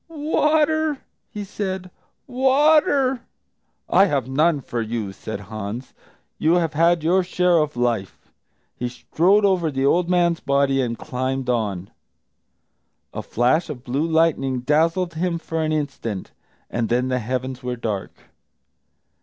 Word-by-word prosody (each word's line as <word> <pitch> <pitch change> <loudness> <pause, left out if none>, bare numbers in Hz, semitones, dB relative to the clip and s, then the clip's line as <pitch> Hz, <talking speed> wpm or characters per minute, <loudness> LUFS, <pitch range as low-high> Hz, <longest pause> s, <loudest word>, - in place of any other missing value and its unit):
"Water!" 310 0 +1 0.3
he 210 - -6
said; 190 -2 -5 0.3
"water!" 270 0 +3 0.7
"I 195 - +5
have 140 - -1
none 150 +3 +2
for 120 -2 -4
you," 110 -3 -3
said 100 +1 -7
Hans; 110 +4 -7 0.5
"you 160 +3 +3
have 165 -3 +1
had 165 +1 +3
your 180 +4 +3
share 180 -1 +2
of 150 -3 -1
life." 115 -6 -2 0.4
He 125 - -3
strode 185 +11 +2
over 180 -5 +2
the 135 -2 -1
old 170 +5 +2
man's 175 -2 +2
body 140 -1 +1
and 115 -2 -2
climbed 130 0 -2
on. 100 -6 -2 1.2
A - - -4
flash 140 +9 +1
of 130 -5 -7
blue 140 +6 -1
lightning 160 -6 +1
dazzled 165 +6 +1
him 170 +1 -1
for 165 -1 -4
an 155 0 0
instant, 140 -10 -3 0.4
and 115 -2 -2
then 125 +2 +1
the 125 0 0
heavens 130 +2 -4
were 125 -1 -3
dark. 110 -5 -5
150 Hz, 135 wpm, -22 LUFS, 125-180 Hz, 1.2 s, I